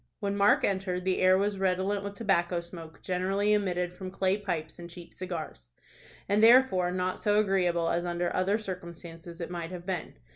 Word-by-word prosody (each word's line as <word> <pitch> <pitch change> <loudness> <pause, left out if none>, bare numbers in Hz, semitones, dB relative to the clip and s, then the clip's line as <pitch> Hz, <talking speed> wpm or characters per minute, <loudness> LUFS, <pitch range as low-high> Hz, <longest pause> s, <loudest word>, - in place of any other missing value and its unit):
When 200 -1 -2
Mark 200 0 +4
entered, 185 -2 -1
the 190 -1 +1
air 185 0 +5
was 200 0 -1
redolent 190 +2 0
with 200 0 -6
tobacco 180 -5 +1
smoke, 170 -2 -11
generally 195 +3 0
emitted 180 -4 0
from 185 +1 -7
clay 190 0 +1
pipes 175 -6 -4
and 170 0 -9
cheap 170 0 -12
cigars, 165 - -6 0.6
and 205 +2 +2
therefore 230 -7 +6
not 185 0 -2
so 210 -1 +2
agreeable 180 -5 +1
as 170 +1 0
under 175 0 -2
other 190 +3 +2
circumstances 170 -4 -8
it 170 - -5
might 170 -2 -4
have 180 -1 -8
been. 180 -4 -4
185 Hz, 180 wpm, -29 LUFS, 175-200 Hz, 0.6 s, therefore